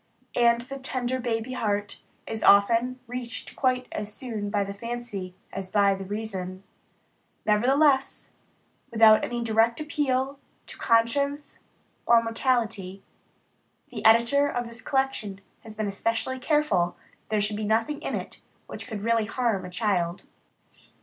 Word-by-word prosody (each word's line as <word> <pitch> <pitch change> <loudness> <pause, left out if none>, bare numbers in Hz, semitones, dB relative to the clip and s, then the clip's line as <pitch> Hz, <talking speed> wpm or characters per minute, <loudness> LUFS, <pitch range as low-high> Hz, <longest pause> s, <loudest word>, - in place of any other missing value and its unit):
And 235 -1 +4
the 275 +3 -8
tender 260 -1 -2
baby 235 0 -2
heart 205 -4 -2 0.2
is 220 -1 -5
often 230 +5 +4
reached 245 -1 -6
quite 255 -2 +1
as 210 0 -4
soon 215 -3 -5
by 205 -1 +1
the 200 0 -5
fancy 210 -4 -6 0.2
as 190 -1 -5
by 200 -1 +4
the 195 0 -5
reason. 190 -2 -5 0.8
Nevertheless, 265 +6 +2 0.6
without 220 -2 +6
any 240 -1 -2
direct 225 +2 +2
appeal 275 -3 -1 0.3
to - - -10
conscience 280 +5 +1 0.5
or 235 -1 +6
morality, 225 -5 -1 0.9
the - - -7
Editor 235 +6 +5
of 245 -3 -2
this 235 +1 -8
collection 265 -8 -1 0.2
has 220 -1 -12
been 215 0 -2
especially 230 +5 -2
careful 255 - +1 0.2
that - - -34
there 215 -1 +1
should 205 +1 -1
be 215 - -3
nothing 225 +7 0
in - - -2
it - - -7 0.2
which - - -8
could 210 -3 -6
really 230 -1 +2
harm 225 -3 -1
a - - -7
child. 180 -3 -1
230 Hz, 140 wpm, -26 LUFS, 205-255 Hz, 0.9 s, without